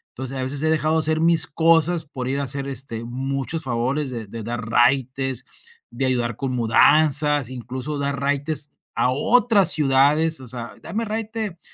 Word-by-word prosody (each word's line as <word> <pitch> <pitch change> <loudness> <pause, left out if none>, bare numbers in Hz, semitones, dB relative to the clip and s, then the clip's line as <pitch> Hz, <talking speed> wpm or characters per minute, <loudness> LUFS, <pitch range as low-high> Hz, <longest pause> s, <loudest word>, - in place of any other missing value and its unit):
Entonces 130 +1 -5
a - - -3
veces 140 +3 -4
he 160 - +2
dejado 155 0 +1
de - - +3
hacer 155 +1 +1
mis 165 -1 +3
cosas 165 +1 +2
por 130 -3 -6
ir 140 +1 -1
a - - -1
hacer 140 +1 -1
este, 115 -3 -5
muchos 135 +5 -4
favores 130 +4 -2
de 115 -3 -6
de 115 +2 -7
dar 115 0 -5
raites, 130 +1 +1 0.5
de 130 +3 -2
ayudar 120 -3 -1
con 135 -2 -3
mudanzas, 145 +3 +4
incluso 130 +4 -6
dar 140 -1 -2
raites 145 +1 -1 0.2
a 125 - +1
otras 215 - +4
ciudades. 150 +2 +2
O 130 - -11
sea: 120 -1 -6
"Dame 225 +2 -4
raite 215 -4 -5
140 Hz, 175 wpm, -22 LUFS, 125-155 Hz, 0.5 s, mudanzas